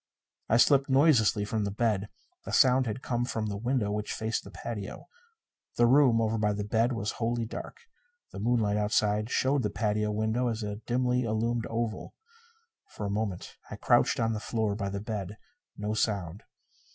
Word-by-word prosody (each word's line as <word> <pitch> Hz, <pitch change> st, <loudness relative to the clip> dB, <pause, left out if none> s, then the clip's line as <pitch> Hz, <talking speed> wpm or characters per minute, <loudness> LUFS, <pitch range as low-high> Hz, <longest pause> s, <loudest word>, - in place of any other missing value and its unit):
I 115 Hz, -, +4 dB
slipped 135 Hz, +2 st, +4 dB
noiselessly 130 Hz, -7 st, +4 dB
from 110 Hz, 0 st, -1 dB
the 100 Hz, -, -1 dB
bed. 105 Hz, -1 st, 0 dB, 0.3 s
The -, -, -7 dB
sound 130 Hz, -1 st, +4 dB
had 120 Hz, +4 st, -4 dB
come 120 Hz, -1 st, -1 dB
from 110 Hz, -3 st, -2 dB
the 105 Hz, -1 st, -3 dB
window 115 Hz, 0 st, -1 dB
which 105 Hz, 0 st, -3 dB
faced 110 Hz, +1 st, -2 dB
the -, -, -11 dB
patio. 105 Hz, -4 st, -7 dB, 0.7 s
The 120 Hz, -, +5 dB
room, 125 Hz, -2 st, +5 dB
over 110 Hz, 0 st, 0 dB
by 105 Hz, -1 st, +1 dB
the 105 Hz, 0 st, -3 dB
bed, 115 Hz, +4 st, +1 dB
was 110 Hz, -2 st, -2 dB
wholly 115 Hz, 0 st, 0 dB
dark. 460 Hz, -, -8 dB, 0.5 s
The -, -, -8 dB
moonlight 110 Hz, -2 st, +1 dB
outside 105 Hz, +1 st, +1 dB
showed 135 Hz, +2 st, +1 dB
the 105 Hz, -, -1 dB
patio 105 Hz, 0 st, -1 dB
window 110 Hz, +4 st, 0 dB
as 115 Hz, -1 st, -2 dB
a 105 Hz, 0 st, -4 dB
dimly 125 Hz, 0 st, +1 dB
illumined 115 Hz, 0 st, -1 dB
oval. 115 Hz, -1 st, -3 dB, 0.8 s
For 105 Hz, -, -4 dB
a 100 Hz, -, -2 dB
moment 100 Hz, -3 st, -3 dB
I -, -, -6 dB
crouched -, -, +2 dB
on 115 Hz, 0 st, +1 dB
the 110 Hz, -, -3 dB
floor 110 Hz, -1 st, -1 dB
by 100 Hz, -1 st, -3 dB
the 100 Hz, 0 st, -4 dB
bed. 105 Hz, -2 st, -5 dB, 0.4 s
No 105 Hz, +1 st, -2 dB
sound. 100 Hz, -4 st, -1 dB
110 Hz, 180 wpm, -29 LUFS, 105-120 Hz, 0.8 s, The